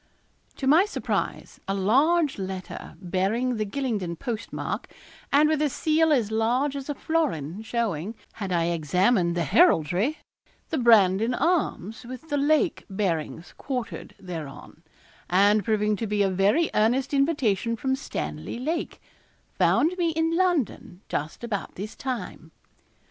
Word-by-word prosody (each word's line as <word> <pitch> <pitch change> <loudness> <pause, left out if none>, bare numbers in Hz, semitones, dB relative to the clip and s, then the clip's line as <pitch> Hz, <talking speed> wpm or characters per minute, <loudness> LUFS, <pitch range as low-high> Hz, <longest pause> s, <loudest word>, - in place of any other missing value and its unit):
To 270 - -5
my 315 +8 +6
surprise, 420 - -3
a 195 - 0
large 275 - +2
letter, 190 -1 -6
bearing 195 +7 0
the 215 -1 -1
Gylingden 210 -8 -2
postmark, 225 +2 -4 0.4
and 295 +2 +5
with 310 -1 +1
a 300 - +2
seal 315 +3 +2
as 235 -7 +2
large 245 +6 +1
as 275 +1 -6
a 290 - -2
florin, 215 - -1
showing, 220 -4 -2 0.2
had 195 -4 -5
I 170 -1 +1
examined 175 - +2
the 170 - +1
heraldry, 200 - +3 0.5
the 315 - 0
Brandon 225 0 +4
arms 260 - -1
with 255 +6 -9
the 290 - 0
Lake 310 +4 +2
bearings 175 -4 -2
quartered 240 -10 -5
thereon, 165 -4 -8 0.5
and 200 +3 +4
proving 210 0 +1
to 225 - -3
be 205 0 +1
a 195 - +1
very 200 - +2
earnest 245 +6 +2
invitation 260 -6 +1
from 265 +4 -1
Stanley 75 - -5
Lake, 320 +7 -3 0.5
found 335 +4 +3
me 340 -1 +2
in 325 +1 +1
London 265 - 0
just 155 +9 -4
about 215 -4 -4
this 210 +4 -6
time. 230 -10 -5
225 Hz, 140 wpm, -26 LUFS, 190-285 Hz, 0.5 s, my